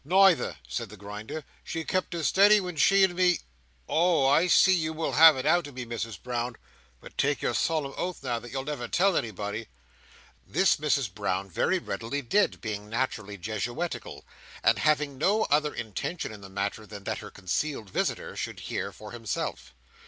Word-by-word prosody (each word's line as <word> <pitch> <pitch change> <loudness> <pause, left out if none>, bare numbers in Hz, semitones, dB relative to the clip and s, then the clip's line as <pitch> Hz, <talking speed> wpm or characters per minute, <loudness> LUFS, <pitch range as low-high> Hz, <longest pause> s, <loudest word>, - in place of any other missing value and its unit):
"Neither," 180 - +4
said 95 - -4
the 105 - -11
Grinder. 105 +10 -7 0.2
"She 165 -1 -4
kept 185 +1 -1
as 165 -3 0
steady 205 +2 +6
when 180 -3 -5
she 195 +6 +5
and 190 -2 +3
me—oh, 150 - 0
I 145 +6 +4
see 190 +1 +6
you 160 -3 0
will 160 0 -2
have 160 -1 +8
it 130 - -3
out 165 0 +3
of 145 - -12
me, 125 -1 -5
Misses 115 -3 -4
Brown! 120 +1 -3 0.4
But - - -13
take - - +1
your - - +1
solemn 155 -4 0
oath 180 -5 -4
now, 120 -3 -1
that 120 0 -11
you'll 135 +1 -3
never 140 -5 -4
tell 190 +7 +2
anybody." 105 - -3 0.8
This - - +2
Mrs 140 -8 0
Brown 95 +1 -2
very 190 - +1
readily 120 - -4
did: 200 - +1
being 105 -2 -5
naturally 110 -4 -2
Jesuitical; 115 - -4 0.4
and - - +4
having 150 -3 +1
no 205 +7 +3
other 150 0 +3
intention 115 - -4
in 105 -2 -10
the 95 - -10
matter 100 +2 -3
than 100 0 -9
that - - -3
her - - -9
concealed 105 - -3
visitor - - -2
should - - -5
hear - - -3
for 105 - -11
himself. 115 - -4
130 Hz, 180 wpm, -28 LUFS, 105-165 Hz, 0.8 s, have